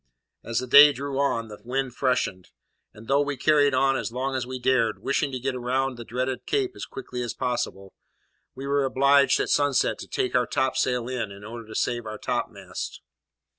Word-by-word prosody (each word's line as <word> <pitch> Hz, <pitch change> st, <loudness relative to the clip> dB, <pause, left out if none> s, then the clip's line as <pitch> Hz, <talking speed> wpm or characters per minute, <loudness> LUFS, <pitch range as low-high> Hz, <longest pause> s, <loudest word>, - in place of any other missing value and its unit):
As 115 Hz, 0 st, -3 dB
the 130 Hz, -, 0 dB
day 145 Hz, +4 st, +9 dB
drew 140 Hz, +1 st, -4 dB
on, 115 Hz, -5 st, 0 dB
the 105 Hz, -1 st, -10 dB
wind 130 Hz, +1 st, -2 dB
freshened; 125 Hz, -9 st, -1 dB, 0.4 s
and, 110 Hz, +1 st, -14 dB
though 140 Hz, +1 st, +3 dB
we 145 Hz, -1 st, -2 dB
carried 145 Hz, 0 st, +3 dB
on 135 Hz, +1 st, +3 dB
as 115 Hz, -, -3 dB
long 130 Hz, +3 st, -2 dB
as 130 Hz, -2 st, -2 dB
we 130 Hz, 0 st, -4 dB
dared, 120 Hz, -3 st, +1 dB
wishing 140 Hz, 0 st, 0 dB
to 130 Hz, -, -3 dB
get 130 Hz, +1 st, -2 dB
round 130 Hz, +1 st, -1 dB
the 120 Hz, -, -8 dB
dreaded 125 Hz, +2 st, -3 dB
Cape 400 Hz, -2 st, 0 dB
as -, -, -7 dB
quickly 375 Hz, -, -6 dB
as 120 Hz, -2 st, -4 dB
possible, 120 Hz, -6 st, -3 dB, 0.6 s
we 135 Hz, -, -7 dB
were 140 Hz, 0 st, +1 dB
obliged 140 Hz, +1 st, +4 dB
at -, -, -1 dB
sunset 145 Hz, -2 st, +2 dB
to -, -, -8 dB
take 125 Hz, -, -2 dB
our 125 Hz, -2 st, +2 dB
topsail 125 Hz, -2 st, 0 dB
in, 125 Hz, -5 st, -3 dB
in 100 Hz, +1 st, -11 dB
order 115 Hz, +1 st, -8 dB
to 110 Hz, -, -10 dB
save 120 Hz, -2 st, -1 dB
our 110 Hz, 0 st, -5 dB
topmast. -, -, -4 dB
130 Hz, 200 wpm, -25 LUFS, 120-140 Hz, 0.6 s, day